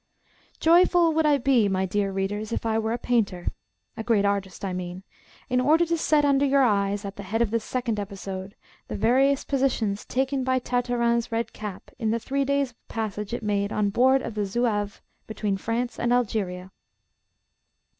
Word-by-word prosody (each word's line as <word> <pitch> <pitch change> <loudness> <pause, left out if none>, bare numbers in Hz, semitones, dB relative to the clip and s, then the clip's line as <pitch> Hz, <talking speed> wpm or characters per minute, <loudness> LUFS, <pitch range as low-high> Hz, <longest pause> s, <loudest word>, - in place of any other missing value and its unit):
JOYFUL 340 0 +5
would 315 0 +2
I 290 -1 +4
be, 240 -5 +3
my 190 0 0
dear 195 +1 -1
readers, 205 +3 -3
if 230 - -3
I 225 0 +1
were 220 0 -1
a 235 - 0
painter 215 -8 0 0.5
a 225 - -5
great 220 -3 +2
artist, 200 -1 -2
I 190 - -2
mean 180 +1 -5 0.4
in 250 0 +1
order 315 +6 +4
to 335 0 0
set 305 -2 +2
under 280 -1 +3
your 275 -1 +4
eyes, 200 -3 +1
at 200 0 -7
the - - -5
head 225 +2 0
of 230 -3 +1
this 230 -1 0
second 240 -4 -2
episode, 195 -1 -6 0.3
the - - -5
various 265 +6 +3
positions 250 -7 0
taken 265 +1 -1
by 260 0 +1
Tartarin's 240 -2 0
red 230 +1 -2
cap 210 -3 -8
in 225 -3 0
the 225 - +1
three 275 +4 -1
days' 280 -2 0
passage 210 -2 -4
it 240 - -4
made 205 -1 0
on 205 -1 0
board 260 +4 +4
of 230 - -5
the 210 -1 -2
Zouave, 205 -1 -1 0.2
between 210 -2 -2
France 230 +5 -3
and 240 - 0
Algeria. 195 -6 -1
225 Hz, 185 wpm, -25 LUFS, 200-260 Hz, 0.5 s, JOYFUL